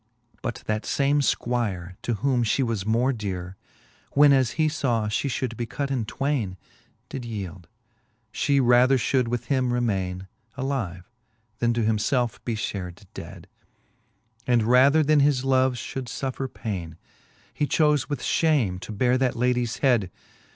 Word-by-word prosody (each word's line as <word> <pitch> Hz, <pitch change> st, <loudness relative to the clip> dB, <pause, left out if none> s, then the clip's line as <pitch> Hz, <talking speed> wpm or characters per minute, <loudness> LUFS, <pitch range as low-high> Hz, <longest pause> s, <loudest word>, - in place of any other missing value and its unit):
But 120 Hz, -, -4 dB
that 110 Hz, 0 st, -1 dB
fame 145 Hz, +1 st, +2 dB
fquire, 105 Hz, -10 st, -1 dB
to 120 Hz, -, -1 dB
whom 125 Hz, +3 st, +1 dB
flie 115 Hz, +4 st, +1 dB
was 110 Hz, -4 st, -2 dB
more 120 Hz, +4 st, +2 dB
dere, 95 Hz, -5 st, -5 dB, 0.6 s
When 145 Hz, 0 st, +6 dB
as 130 Hz, -4 st, +2 dB
he 155 Hz, -1 st, +3 dB
faw 120 Hz, -8 st, 0 dB
fhe 105 Hz, -, -1 dB
fhould 125 Hz, -2 st, -2 dB
be 120 Hz, +1 st, -4 dB
cut 140 Hz, +3 st, -3 dB
in 125 Hz, -5 st, -1 dB
twaine, 115 Hz, -6 st, -2 dB, 0.5 s
Did 130 Hz, -, -6 dB
yield, 95 Hz, -6 st, -6 dB, 0.7 s
fhe 140 Hz, +3 st, +2 dB
rather 125 Hz, +2 st, +5 dB
flioiild 125 Hz, +1 st, +1 dB
with 120 Hz, 0 st, -2 dB
him 130 Hz, -2 st, +1 dB
remaine 95 Hz, -6 st, -1 dB, 0.3 s
Alive, 115 Hz, -10 st, -3 dB, 0.5 s
then 120 Hz, 0 st, +2 dB
to 120 Hz, -, +1 dB
him 110 Hz, 0 st, +2 dB
felfe 120 Hz, +2 st, 0 dB
be 115 Hz, -, -2 dB
fhared 95 Hz, -2 st, -5 dB
dead; -, -, -9 dB, 1.0 s
And 120 Hz, -3 st, +3 dB
rather 130 Hz, +7 st, +5 dB
then 150 Hz, 0 st, +4 dB
his 140 Hz, -2 st, +2 dB
love 130 Hz, -1 st, +3 dB
fhcv;ld 125 Hz, +2 st, -5 dB
fuffer 130 Hz, +1 st, -4 dB
paine, 85 Hz, -7 st, -5 dB, 0.6 s
He 145 Hz, -, -1 dB
chofe 150 Hz, -2 st, +2 dB
with 145 Hz, -, -3 dB
fhame 135 Hz, -, +1 dB
to 110 Hz, -, -8 dB
beare 125 Hz, +4 st, +2 dB
that 130 Hz, -2 st, +1 dB
ladies 125 Hz, -1 st, 0 dB
head. 115 Hz, -8 st, +3 dB
120 Hz, 155 wpm, -25 LUFS, 105-135 Hz, 1.0 s, When